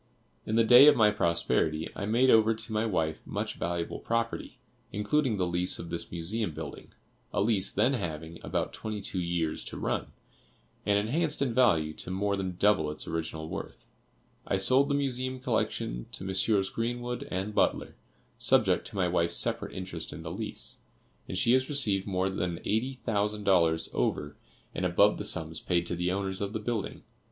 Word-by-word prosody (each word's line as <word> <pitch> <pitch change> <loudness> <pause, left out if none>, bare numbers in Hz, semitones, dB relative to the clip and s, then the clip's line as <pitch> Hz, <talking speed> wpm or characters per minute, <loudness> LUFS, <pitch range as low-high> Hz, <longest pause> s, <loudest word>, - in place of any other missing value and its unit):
In 110 - 0
the 115 - +5
day 125 +5 +9
of 150 - +8
my 105 -2 +5
prosperity 85 -4 +1
I 100 - -4
made 125 +4 +4
over 110 0 +5
to 110 0 -5
my 110 +1 +1
wife 80 -6 -1
much - - -3
valuable 85 -1 -3
property, 115 0 -2 0.3
including 110 +4 0
the 90 - +1
lease 90 +1 +1
of 85 - -8
this 85 - -4
Museum 85 +1 -2
building, - - -8 0.4
a - - -1
lease 100 -2 +1
then 135 - +2
having 80 - -4
about - - -2
twenty 110 -1 -5
two 95 -1 -3
years 85 -2 -1
to - - -6
run, - - -2 0.8
and 100 0 +4
enhanced 150 +9 0
in 125 -4 -1
value 80 -11 +3
to 90 - -4
more 100 +2 0
than 95 -2 -3
double 100 -7 +3
its 75 - -4
original 80 -1 -4
worth. - - -7 0.6
I 95 - +1
sold 130 +9 +5
the 140 - +2
Museum 130 -2 -1
collection - - -2
to - - -6
Messrs. 95 +1 +1
Greenwood 120 +1 -3
and 95 +3 -3
Butler, - - +1 0.4
subject - - +3
to - - -10
my 95 -2 +1
wife's 85 -1 +1
separate - - 0
interest 90 -3 -5
in 80 - -8
the 80 - -5
lease, 90 - -4 0.5
and 95 - -3
she 115 +5 +4
has 130 0 +2
received 105 -10 0
more 95 0 0
than 85 -2 -2
eighty 125 +5 0
thousand 105 -1 0
dollars 85 -4 +3
over 75 0 -1 0.4
and - - -3
above 90 +4 +4
the - - -3
sums 80 -6 -2
paid 85 -1 0
to 85 - -2
the 90 +1 -1
owners 95 0 -2
of 100 +1 -3
the 110 - -2
building. 110 -1 -3
100 Hz, 180 wpm, -29 LUFS, 85-115 Hz, 0.8 s, day